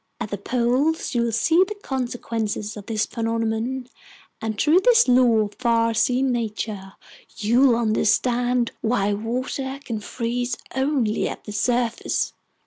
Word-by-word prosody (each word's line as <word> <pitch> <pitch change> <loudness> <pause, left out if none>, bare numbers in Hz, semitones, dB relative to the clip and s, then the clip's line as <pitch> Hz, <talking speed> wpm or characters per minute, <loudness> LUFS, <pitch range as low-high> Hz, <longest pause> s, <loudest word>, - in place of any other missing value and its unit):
At 235 -3 -5
the 205 - -2
poles 255 +9 0
you'll 235 -1 +1
see 320 - +4
the 420 - -5
consequences 230 - -3
of 205 -2 -10
this 220 -1 0
phenomenon, 230 +2 -2 0.5
and 220 -2 -3
through 315 +4 +5
this 470 - +5
law 245 -3 +5
of 210 -1 -3
farseeing 235 +2 +2
nature, 215 -4 -4 0.4
you'll 240 +4 +4
understand 240 +2 +1
why 215 -3 +1
water 255 +5 -3
can 225 -3 -3
freeze 240 +3 -3 0.2
only 265 -5 0
at - - -8
the 210 - -8
surface!" 235 +2 0
235 Hz, 130 wpm, -23 LUFS, 220-255 Hz, 0.5 s, through